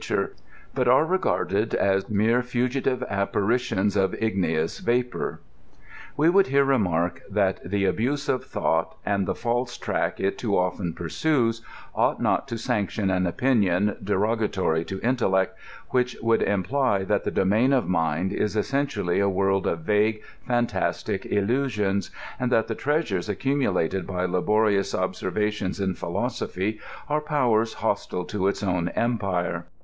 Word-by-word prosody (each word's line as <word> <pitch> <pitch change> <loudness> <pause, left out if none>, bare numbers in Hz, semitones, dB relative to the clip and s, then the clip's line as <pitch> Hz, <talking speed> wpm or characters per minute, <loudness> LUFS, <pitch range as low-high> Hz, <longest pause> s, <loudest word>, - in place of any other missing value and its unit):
ture, - - -1 0.4
but 130 -2 0
are 130 +5 +5
regarded 115 - 0
as 95 0 +1
mere 110 +4 +2
fugitive 125 +1 -1
apparitions 100 0 0
of 95 -1 +2
igiico</» 85 -7 -1
vapor." 125 +1 -1 0.8
We 150 - +4
would 190 +3 +5
here 140 +1 +4
remark 90 -11 +1
that 100 -2 +1
the 100 +2 0
abuse 130 +9 0
of 130 - 0
thought, 80 0 -1
and 100 -2 0
the - - -1
false 120 +1 -2
track - - -2
it 95 - -1
too 105 -5 0
often 90 -1 -1
pursues, 115 - 0 0.3
ought - - +1
not - - +1
to 115 - -4
sanction 105 -2 -1
an 90 -1 +1
opinion 105 -2 +2
derogatory 100 -5 0
to 95 - -5
intellect, 105 -7 +1 0.4
which 125 -1 +1
would 115 0 +2
imply 100 +2 +1
that 95 - 0
the - - -1
domain 110 +8 +2
of 130 -3 +2
mind 85 +2 0
is 105 +1 -1
essentially 110 -6 0
a 100 0 +3
world 95 0 +1
of 85 - -1
vague 105 +4 +1 0.2
fantastic 120 -1 -1
illusions, 105 -2 0 0.3
and 125 0 -1
that 115 -2 +3
the 115 - -2
treasures 120 - -1
accumulated 100 - 0
by 90 -1 -1
laborious 100 +2 +1
ob 95 0 0
servations 105 +1 -2
in 95 -2 0
philosophy 105 +2 -3 0.3
are 150 +1 0
powers 120 -7 +1
hostile 90 0 -2
to 95 -1 -1
its 100 - -1
own 90 -3 0
empire. 100 -7 -1
105 Hz, 145 wpm, -25 LUFS, 95-125 Hz, 0.8 s, are